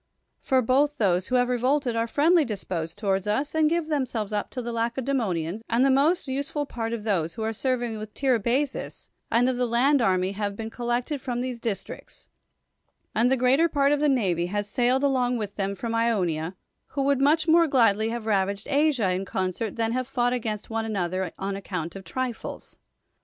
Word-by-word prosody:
For 260 Hz, -2 st, +2 dB
both 280 Hz, +5 st, +2 dB
those 185 Hz, -3 st, +1 dB
who 255 Hz, -, 0 dB
have 245 Hz, 0 st, +3 dB
revolted 250 Hz, +1 st, +1 dB
are 230 Hz, 0 st, 0 dB
friendly 320 Hz, +7 st, +4 dB
disposed 185 Hz, -, -4 dB
towards 195 Hz, -2 st, 0 dB
us 270 Hz, +8 st, -1 dB
and 315 Hz, -1 st, +3 dB
give 335 Hz, -1 st, 0 dB
themselves 250 Hz, -9 st, -2 dB
up 205 Hz, -, -1 dB
to 255 Hz, -, -6 dB
the 240 Hz, -1 st, -4 dB
Lacedemonians, 230 Hz, -7 st, -1 dB
and 235 Hz, +3 st, +3 dB
the 275 Hz, -, +4 dB
most 290 Hz, +6 st, +2 dB
useful 280 Hz, +2 st, -2 dB
part 230 Hz, -4 st, -4 dB
of 230 Hz, -3 st, -4 dB
those 170 Hz, -7 st, -1 dB
who 220 Hz, -, -4 dB
are 220 Hz, 0 st, -1 dB
serv 255 Hz, +2 st, -1 dB
ing 225 Hz, -2 st, -4 dB
with 215 Hz, 0 st, -8 dB
Tiribazus 260 Hz, +2 st, -1 dB, 0.2 s
and 240 Hz, +2 st, +3 dB
of 255 Hz, -1 st, 0 dB
the 250 Hz, 0 st, +1 dB
land 260 Hz, +4 st, +3 dB
army 185 Hz, -3 st, +2 dB
have 205 Hz, 0 st, -3 dB
been 225 Hz, +1 st, -6 dB
collected 245 Hz, +4 st, -2 dB
from 245 Hz, -2 st, -3 dB
these 250 Hz, -1 st, -4 dB
districts, 225 Hz, -4 st, -6 dB, 0.9 s
and 235 Hz, +3 st, +3 dB
the 265 Hz, -, +3 dB
greater 265 Hz, +7 st, +3 dB
part 280 Hz, -2 st, +2 dB
of 295 Hz, -, +2 dB
the 300 Hz, 0 st, +3 dB
navy 185 Hz, -10 st, +1 dB
has 205 Hz, +2 st, -2 dB
sailed 250 Hz, +5 st, +1 dB
along 250 Hz, -3 st, +2 dB
with 205 Hz, -3 st, -5 dB
them 200 Hz, 0 st, -2 dB
from 230 Hz, +4 st, -4 dB
Ionia, 185 Hz, -8 st, 0 dB, 0.3 s
who 275 Hz, -, -2 dB
w^ould 280 Hz, -1 st, +2 dB
much 310 Hz, +4 st, +3 dB
more 335 Hz, +1 st, +5 dB
gladly 225 Hz, -5 st, +3 dB
have 235 Hz, -1 st, -4 dB
ravaged 200 Hz, -1 st, 0 dB
Asia 275 Hz, -9 st, +2 dB
in 185 Hz, +1 st, -1 dB
concert 190 Hz, +3 st, -3 dB
than, 225 Hz, -1 st, 0 dB
have 255 Hz, +1 st, -1 dB
fought 245 Hz, -2 st, +1 dB
against 220 Hz, -3 st, -4 dB
one 225 Hz, 0 st, -1 dB
another 185 Hz, -4 st, -2 dB
on 195 Hz, 0 st, -3 dB
account 180 Hz, -4 st, -5 dB
of 195 Hz, -, -8 dB
trifles. 255 Hz, +1 st, -5 dB
235 Hz, 195 wpm, -26 LUFS, 205-265 Hz, 0.9 s, more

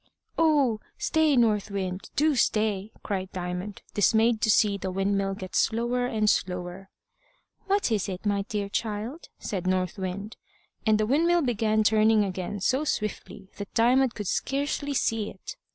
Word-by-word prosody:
"Oh! 290 Hz, -9 st, +3 dB, 0.2 s
stay, 315 Hz, -3 st, +2 dB
North 215 Hz, -4 st, +2 dB
Wind, 190 Hz, -2 st, -4 dB
do 305 Hz, +1 st, +3 dB
stay!" 215 Hz, -3 st, +1 dB
cried 190 Hz, -2 st, -3 dB
Diamond, 180 Hz, +2 st, -5 dB
dismayed 220 Hz, +2 st, +3 dB
to -, -, +2 dB
see 205 Hz, -1 st, +4 dB
the 190 Hz, -1 st, -4 dB
windmill 195 Hz, +1 st, 0 dB
get 185 Hz, -1 st, -8 dB
slower 240 Hz, +2 st, +1 dB
and 215 Hz, -3 st, 0 dB
slower. 180 Hz, -1 st, -1 dB, 0.8 s
"What 395 Hz, -, +1 dB
is 210 Hz, -2 st, 0 dB
it, 185 Hz, +2 st, -6 dB
my 200 Hz, -1 st, +1 dB
dear 205 Hz, -3 st, -2 dB
child?" 220 Hz, +8 st, -4 dB
said 185 Hz, -3 st, -4 dB
North 185 Hz, 0 st, 0 dB
Wind, 190 Hz, +3 st, -5 dB, 0.5 s
and 215 Hz, -1 st, +5 dB
the 215 Hz, -, +2 dB
windmill 335 Hz, +7 st, +3 dB
began 220 Hz, -3 st, +1 dB
turning 215 Hz, 0 st, +4 dB
again 190 Hz, +1 st, -4 dB
so 260 Hz, +9 st, +1 dB
swiftly 210 Hz, -6 st, -4 dB
that 205 Hz, -1 st, -8 dB
Diamond 250 Hz, +2 st, +3 dB
could 210 Hz, -, -5 dB
scarcely 285 Hz, +5 st, -1 dB
see 225 Hz, -4 st, 0 dB
it. 190 Hz, -, -9 dB
215 Hz, 150 wpm, -27 LUFS, 195-240 Hz, 0.8 s, and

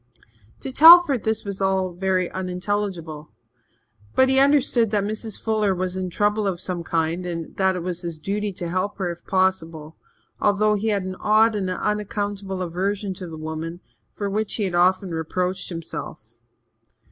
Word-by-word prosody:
To 270 Hz, -, -4 dB
Telford 320 Hz, -2 st, +8 dB
this 220 Hz, -1 st, -1 dB
was 200 Hz, -1 st, -5 dB
all 190 Hz, -1 st, +1 dB
very 185 Hz, 0 st, 0 dB
unintelligible. 180 Hz, -4 st, -3 dB, 0.9 s
But 260 Hz, -, +5 dB
he 265 Hz, 0 st, +4 dB
understood 270 Hz, -5 st, +3 dB
that 205 Hz, -1 st, +1 dB
Mrs. 215 Hz, +1 st, -4 dB
Fuller 215 Hz, -3 st, +1 dB
was 185 Hz, 0 st, -2 dB
in 185 Hz, -1 st, -3 dB
trouble 205 Hz, +3 st, 0 dB
of 185 Hz, -3 st, -2 dB
some 180 Hz, -2 st, -3 dB
kind 165 Hz, +1 st, -1 dB
and 170 Hz, -2 st, -5 dB
that 190 Hz, -1 st, +2 dB
it 180 Hz, -, -4 dB
was 175 Hz, -1 st, -4 dB
his 170 Hz, -3 st, -5 dB
duty 205 Hz, +5 st, -2 dB
to 175 Hz, -1 st, -5 dB
help 185 Hz, +3 st, -2 dB
her 185 Hz, -4 st, -2 dB
if 170 Hz, -, -10 dB
possible, 165 Hz, -5 st, -1 dB, 0.4 s
although 210 Hz, +1 st, +2 dB
he 210 Hz, +1 st, -1 dB
had 205 Hz, -3 st, +1 dB
an 185 Hz, 0 st, -6 dB
odd 220 Hz, +2 st, +4 dB
and 195 Hz, -3 st, -2 dB
unaccountable 205 Hz, -1 st, -3 dB
aversion 190 Hz, +3 st, -2 dB
to 185 Hz, 0 st, -7 dB
the 160 Hz, -1 st, -8 dB
woman, 160 Hz, +2 st, -5 dB, 0.4 s
for 205 Hz, -, -3 dB
which 210 Hz, +2 st, -2 dB
he 215 Hz, -, -1 dB
had 185 Hz, -3 st, -2 dB
often 185 Hz, +1 st, +2 dB
reproached 180 Hz, +3 st, -2 dB
himself. 165 Hz, -2 st, -7 dB
190 Hz, 170 wpm, -23 LUFS, 175-210 Hz, 0.9 s, Telford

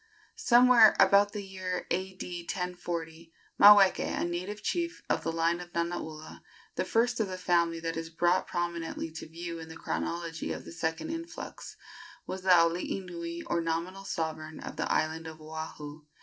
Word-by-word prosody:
Somewhere 245 Hz, -, +7 dB
about 200 Hz, 0 st, +6 dB
the 205 Hz, -1 st, -5 dB
year 185 Hz, -2 st, -4 dB
A.D. 180 Hz, -1 st, -4 dB
1040 170 Hz, -3 st, -4 dB, 0.3 s
Maweke, 200 Hz, -2 st, +8 dB, 0.2 s
a -, -, 0 dB
native 185 Hz, +5 st, -4 dB
chief 340 Hz, 0 st, -2 dB
of -, -, +1 dB
the 165 Hz, -, -2 dB
line 165 Hz, +1 st, +1 dB
of 175 Hz, -1 st, -9 dB
Nanaula 170 Hz, -2 st, -4 dB, 0.3 s
the -, -, -1 dB
first 240 Hz, +2 st, +1 dB
of 215 Hz, -, +1 dB
the 185 Hz, -1 st, -5 dB
family 170 Hz, -2 st, +1 dB
that 165 Hz, 0 st, -3 dB
is 165 Hz, 0 st, -4 dB
brought 175 Hz, +2 st, +1 dB
prominently 170 Hz, -2 st, -3 dB
to 160 Hz, -, -8 dB
view 170 Hz, 0 st, -6 dB
in 160 Hz, 0 st, -9 dB
the 160 Hz, -, -9 dB
chronology 165 Hz, -, -3 dB
of -, -, -8 dB
the -, -, -9 dB
second 165 Hz, -, -3 dB
influx 330 Hz, 0 st, -7 dB, 0.5 s
was 190 Hz, -, -5 dB
the 190 Hz, -, -2 dB
alii 170 Hz, +2 st, +4 dB
nui, 170 Hz, -2 st, -6 dB
or 170 Hz, -, -1 dB
nominal 170 Hz, +4 st, -3 dB
sovereign, 160 Hz, -3 st, -4 dB
of -, -, -7 dB
the -, -, -2 dB
island 160 Hz, +1 st, 0 dB
of 160 Hz, 0 st, -9 dB
Oahu. 155 Hz, -1 st, -7 dB
170 Hz, 165 wpm, -30 LUFS, 165-190 Hz, 0.5 s, Maweke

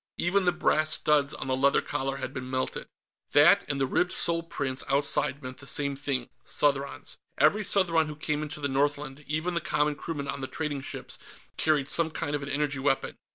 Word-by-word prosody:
Even 185 Hz, +2 st, +2 dB
the 180 Hz, -, +5 dB
brass 155 Hz, -3 st, +2 dB
studs 145 Hz, -2 st, +3 dB
on -, -, -6 dB
the 130 Hz, -1 st, 0 dB
leather 140 Hz, +2 st, +4 dB
collar 135 Hz, -1 st, -2 dB
had -, -, -5 dB
been 130 Hz, -1 st, -6 dB
melted. 130 Hz, 0 st, -2 dB, 0.5 s
That 155 Hz, +7 st, +7 dB
and 140 Hz, -1 st, -2 dB
the 135 Hz, -, +3 dB
ribbed 175 Hz, +7 st, +1 dB
sole 170 Hz, -2 st, +2 dB
prints 140 Hz, -5 st, -2 dB
outside 140 Hz, 0 st, +1 dB
meant 130 Hz, 0 st, -7 dB
the 140 Hz, -, -9 dB
same 140 Hz, -1 st, 0 dB
thing 135 Hz, -3 st, -2 dB
Southrons. 140 Hz, -1 st, 0 dB, 0.2 s
Every 210 Hz, +1 st, +4 dB
Southron 170 Hz, -6 st, +3 dB
who 150 Hz, -, -6 dB
came 150 Hz, 0 st, -2 dB
into 150 Hz, 0 st, -5 dB
the 145 Hz, -, -1 dB
Northland, 145 Hz, +1 st, -1 dB
even 155 Hz, +4 st, -1 dB
the 170 Hz, -, 0 dB
common 150 Hz, -4 st, +1 dB
crewmen 145 Hz, -1 st, -5 dB
on 140 Hz, 0 st, -4 dB
the 130 Hz, -, -3 dB
trading 145 Hz, -2 st, -3 dB
ships, -, -, -6 dB, 0.4 s
carried 150 Hz, -3 st, +1 dB
some 165 Hz, +2 st, +1 dB
kind 145 Hz, -2 st, -4 dB
of 145 Hz, -, -3 dB
an 140 Hz, -, -5 dB
energy 145 Hz, -1 st, -1 dB
weapon. 135 Hz, 0 st, 0 dB
145 Hz, 200 wpm, -28 LUFS, 135-155 Hz, 0.5 s, That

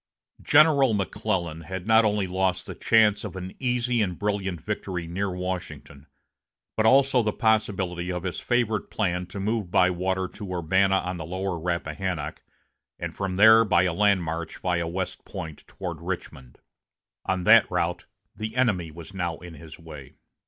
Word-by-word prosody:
General 140 Hz, -7 st, +5 dB
McClellan 95 Hz, -5 st, -2 dB
had 90 Hz, +3 st, -6 dB
not 110 Hz, +1 st, +5 dB
only 105 Hz, -2 st, +1 dB
lost 95 Hz, 0 st, -1 dB
the -, -, -7 dB
chance 110 Hz, -2 st, +3 dB
of -, -, -6 dB
an 95 Hz, 0 st, -6 dB
easy 125 Hz, -2 st, 0 dB
and 90 Hz, -4 st, -1 dB
brilliant 100 Hz, -4 st, -2 dB
victory 95 Hz, -3 st, -4 dB
near 95 Hz, +4 st, -2 dB
Washington, 90 Hz, -5 st, -6 dB, 0.7 s
but 110 Hz, 0 st, +3 dB
also 135 Hz, 0 st, +5 dB
the 110 Hz, -2 st, 0 dB
possibility 95 Hz, -6 st, 0 dB
of 90 Hz, -1 st, -4 dB
his 90 Hz, -2 st, -3 dB
favorite 120 Hz, -3 st, 0 dB
plan 90 Hz, -4 st, -1 dB
to 95 Hz, +3 st, -7 dB
move 105 Hz, -1 st, -1 dB
by 90 Hz, +1 st, +4 dB
water 95 Hz, +1 st, -1 dB
to 100 Hz, +1 st, -9 dB
Urbana 95 Hz, +3 st, +2 dB
on 90 Hz, -1 st, -3 dB
the 80 Hz, -, -5 dB
lower 95 Hz, +1 st, -3 dB
Rappahannock, 85 Hz, -1 st, -3 dB, 0.6 s
and -, -, -5 dB
from 95 Hz, -2 st, -3 dB
there 110 Hz, +3 st, +7 dB
by 95 Hz, -5 st, +3 dB
a 90 Hz, -2 st, 0 dB
land 100 Hz, -1 st, +3 dB
march 80 Hz, 0 st, -4 dB
via 90 Hz, -2 st, -1 dB
West 95 Hz, +2 st, -4 dB
Point 80 Hz, -2 st, -7 dB
toward 85 Hz, -4 st, -6 dB
Richmond. 80 Hz, -8 st, -6 dB, 0.7 s
On 95 Hz, -1 st, 0 dB
that 110 Hz, +3 st, +6 dB
route 90 Hz, 0 st, -2 dB, 0.3 s
the 110 Hz, +1 st, -5 dB
enemy 105 Hz, -10 st, +1 dB
was 85 Hz, +4 st, -11 dB
now 85 Hz, -4 st, -3 dB
in 90 Hz, -1 st, -11 dB
his 80 Hz, +1 st, -12 dB
way. 75 Hz, -5 st, -12 dB
95 Hz, 165 wpm, -25 LUFS, 85-105 Hz, 0.7 s, there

